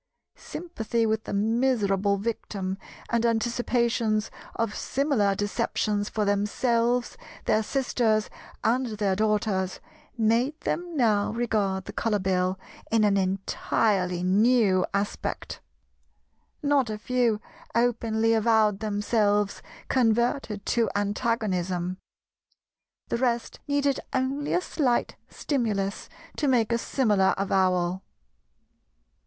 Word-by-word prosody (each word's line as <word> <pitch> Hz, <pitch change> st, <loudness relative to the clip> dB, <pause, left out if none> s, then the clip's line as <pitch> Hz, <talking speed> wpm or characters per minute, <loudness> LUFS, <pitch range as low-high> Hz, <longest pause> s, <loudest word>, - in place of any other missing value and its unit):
Sympathy 235 Hz, -9 st, -3 dB
with 220 Hz, 0 st, 0 dB
the -, -, -5 dB
miserable 205 Hz, -2 st, +1 dB
victim 195 Hz, -3 st, -3 dB, 0.3 s
and 235 Hz, -1 st, +2 dB
anticipations 235 Hz, -1 st, +1 dB, 0.2 s
of 225 Hz, -2 st, -1 dB
similar 255 Hz, -9 st, +1 dB
deceptions 205 Hz, 0 st, -1 dB
for 215 Hz, -1 st, -1 dB
themselves, 230 Hz, +4 st, +1 dB, 0.3 s
their 215 Hz, -, +3 dB
sisters, 225 Hz, -3 st, +1 dB, 0.4 s
and 240 Hz, -2 st, 0 dB
their 200 Hz, -2 st, +1 dB
daughters, 210 Hz, -3 st, 0 dB, 0.4 s
made 235 Hz, +7 st, +1 dB
them 345 Hz, -2 st, -3 dB
now 215 Hz, -5 st, +2 dB
regard 210 Hz, -5 st, -1 dB
the -, -, -8 dB
Colour 225 Hz, -2 st, 0 dB
Bill 185 Hz, -1 st, 0 dB, 0.3 s
in 225 Hz, -1 st, +3 dB
an 205 Hz, -1 st, +3 dB
entirely 190 Hz, -1 st, 0 dB
new 200 Hz, 0 st, +3 dB
aspect. 200 Hz, +1 st, -3 dB, 1.0 s
Not 285 Hz, -4 st, +2 dB
a 215 Hz, -, -3 dB
few 235 Hz, -1 st, +1 dB, 0.4 s
openly 230 Hz, -1 st, +2 dB
avowed 220 Hz, -2 st, +3 dB
themselves 205 Hz, -1 st, +1 dB, 0.3 s
converted 235 Hz, -3 st, +1 dB
to 235 Hz, -2 st, +1 dB
antagonism; 195 Hz, -4 st, -1 dB, 1.1 s
the -, -, 0 dB
rest 240 Hz, -2 st, -1 dB
needed 285 Hz, -1 st, +1 dB
only 270 Hz, +3 st, -1 dB
a 355 Hz, -, +2 dB
slight 265 Hz, -9 st, 0 dB
stimulus 210 Hz, -8 st, -2 dB, 0.3 s
to 295 Hz, -, 0 dB
make 240 Hz, -4 st, +2 dB
a 235 Hz, -, +2 dB
similar 210 Hz, -8 st, +2 dB
avowal. 185 Hz, -2 st, +1 dB
220 Hz, 105 wpm, -26 LUFS, 200-240 Hz, 1.1 s, their